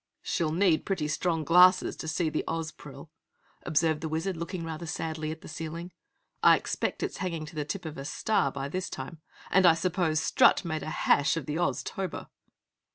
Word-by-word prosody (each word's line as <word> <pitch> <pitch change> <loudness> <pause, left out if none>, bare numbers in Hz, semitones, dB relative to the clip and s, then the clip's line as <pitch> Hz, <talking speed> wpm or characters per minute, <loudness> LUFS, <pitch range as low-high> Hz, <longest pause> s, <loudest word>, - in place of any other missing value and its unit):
"She'll 165 -4 0
need 170 -1 +3
pretty 185 -6 -1
strong 160 +1 0
glasses 180 +3 +5
to - - -6
see 160 0 0
the - - -1
Ozpril," 165 -1 -6 0.5
observed 155 0 +1
the 160 - -3
Wizard, 165 +4 -2
looking 170 +1 -5
rather 165 +1 -6
sadly 155 0 -3
at 160 +1 -6
the - - -11
ceiling. 165 +2 -6 0.5
"I - - +7
expect - - -3
it's - - -3
hanging 165 -4 -3
to 150 - -11
the 150 -1 -2
tip 180 +4 -5
of 155 -3 -6
a 135 - -6
star 145 -3 0
by 135 0 -4
this 185 +5 -3
time! 135 +5 -7 0.3
And 190 -1 +6
I 165 - +7
suppose 165 -2 0
Strut 165 - +4
made 160 -2 -2
hash 155 -1 +2
of 155 - -4
the 150 +2 -3
Oztober!" 175 +4 -3
160 Hz, 185 wpm, -28 LUFS, 155-175 Hz, 0.5 s, I